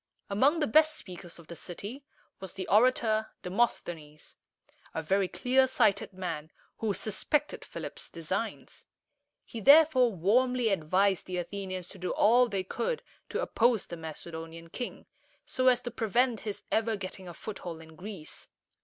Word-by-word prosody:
Among 275 +11 +4
the 300 - +2
best 310 +5 +5
speakers 180 - -9
of 170 - -13
the 170 - -9
city 205 - -7 0.4
was 190 -2 -7
the 190 -1 -5
orator 220 -1 +3 0.2
De 180 - -5
mos´the 210 -4 +1
nes, 150 -1 -15 0.6
a 160 - -2
very 190 +4 +2
clear 250 +9 +3
sighted 215 -7 +2
man, 180 -5 -5 0.3
who 220 -2 0
suspected 270 +9 -1
Philip's - - -7
designs. - - -4 0.6
He 230 - -7
therefore 280 -2 +7
warmly 235 +6 +2
advised 190 +1 +2
the 180 -1 -3
Athenians 185 0 -4
to 195 - -11
do 180 - -3
all 240 +3 +5
they 195 -3 -1
could 465 - -2 0.3
to - - -1
oppose 235 -3 +2
the 170 - -7
Macedonian 165 +1 -8
king, 245 - -5 0.4
so 255 0 0
as 250 -1 +5
to 245 - -5
prevent 235 +1 +1
his 210 -2 -5
ever 225 0 +2
getting 190 -1 -7
a 175 - -7
foothold 175 -6 -6
in 160 0 -13
Greece. 180 -3 -8
200 Hz, 155 wpm, -30 LUFS, 180-245 Hz, 0.6 s, therefore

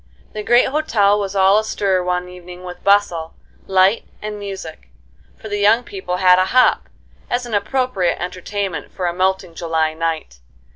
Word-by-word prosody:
The 215 - -4
great 240 +5 +4
hotel 215 -9 +2
was 200 -1 -4
all 195 +2 +5
astir 200 -3 0
one 180 0 -1
evening 180 0 -11
with 180 -1 -9
bustle, 195 -5 +2 0.3
light, 190 +3 +3 0.2
and 210 0 -6
music; 190 - -8 0.5
for - - -10
the 205 -1 -3
young 215 +4 +4
people 190 -5 -5
had 180 -1 +5
a 185 - +3
hop, 255 +6 +3 0.4
as 245 0 -1
an 235 - -7
appropriate 205 -4 0
entertainment 180 -1 -4
for 185 - -4
a 175 - 0
melting 185 -1 -1
July 160 -1 -1
night. 160 - -3
190 Hz, 160 wpm, -19 LUFS, 180-205 Hz, 0.5 s, all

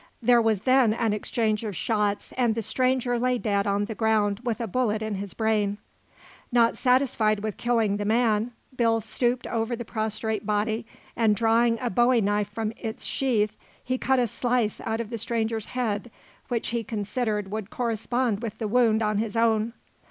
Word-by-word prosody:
There 240 0 +4
was 220 -4 +1
then 255 -3 +4
an 225 -2 +1
exchange 215 +1 -1
of 210 -4 -4
shots 205 0 -1
and 240 -3 +2
the 225 - -2
stranger 250 +2 +1
lay 250 +1 +1
dead 200 -3 0
on 200 +1 +1
the 220 - -5
ground 215 -2 +1
with 235 -4 -2
a 235 - -1
bullet 220 0 0
in 215 -1 -3
his 200 0 -5
brain. 215 -2 +1 0.7
Not 235 -1 +4
satisfied 245 -5 +2
with 215 -1 -4
killing 225 -4 +1
the 205 - -2
man, 225 0 +2 0.3
Bill 230 -2 +2
stooped 240 +3 -1
over 230 +1 -1
the 235 0 -6
prostrate 220 0 -2
body 215 +2 -1 0.3
and 220 -2 +3
drawing 230 +1 +3
a 245 -2 -2
bowie 240 +4 +4
knife 205 0 0
from 220 +1 -3
its 225 -1 -6
sheath, 220 -6 0 0.3
he 255 +1 -2
cut 265 0 +2
a 250 - +3
slice 240 -1 -1
out 225 0 -2
of 230 0 -7
the 230 - -3
stranger's 225 -1 -1
head 240 -3 -2 0.4
which 235 -3 -2
he 235 -1 -1
considered 210 -1 -2
would 215 -1 -4
correspond 235 -1 -1
with 220 -2 -5
the 220 - -2
wound 225 -1 +3
in 210 -1 +1
his 220 0 -2
own. 225 0 +2
225 Hz, 180 wpm, -26 LUFS, 210-240 Hz, 0.7 s, There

